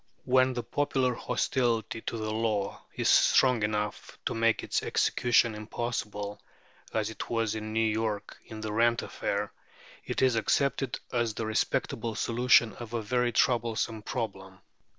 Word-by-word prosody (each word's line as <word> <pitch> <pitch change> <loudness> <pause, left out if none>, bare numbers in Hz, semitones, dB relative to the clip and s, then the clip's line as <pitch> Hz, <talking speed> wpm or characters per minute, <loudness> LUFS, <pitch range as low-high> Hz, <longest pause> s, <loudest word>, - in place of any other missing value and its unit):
When 130 0 +4
the 120 -1 -3
popular 130 -1 0
hostility 115 -3 -1
to 115 - -4
the 110 -1 -3
law 110 -3 -1
is - - 0
strong 125 -3 +5
enough 105 0 -2
to - - 0
make 115 0 +2
its - - 0
execution 120 -2 +2
impossible, 105 -2 -4 0.5
as 110 0 -1
it - - -7
was 115 -2 0
in 110 0 -5
New 110 +1 +2
York 110 -1 -2
in 110 -1 -8
the 110 -1 -4
rent 115 +1 +3
affair, 100 0 -3 0.5
it - - -1
is 130 -3 +4
accepted 135 +3 +1
as 120 -3 0
the 115 - -3
respectable 110 +1 -1
solution 115 -1 +3
of 120 -1 -8
a 115 - -1
very 125 +2 +1
troublesome 115 -2 +1
problem. 95 -5 -5
115 Hz, 150 wpm, -29 LUFS, 110-120 Hz, 0.5 s, strong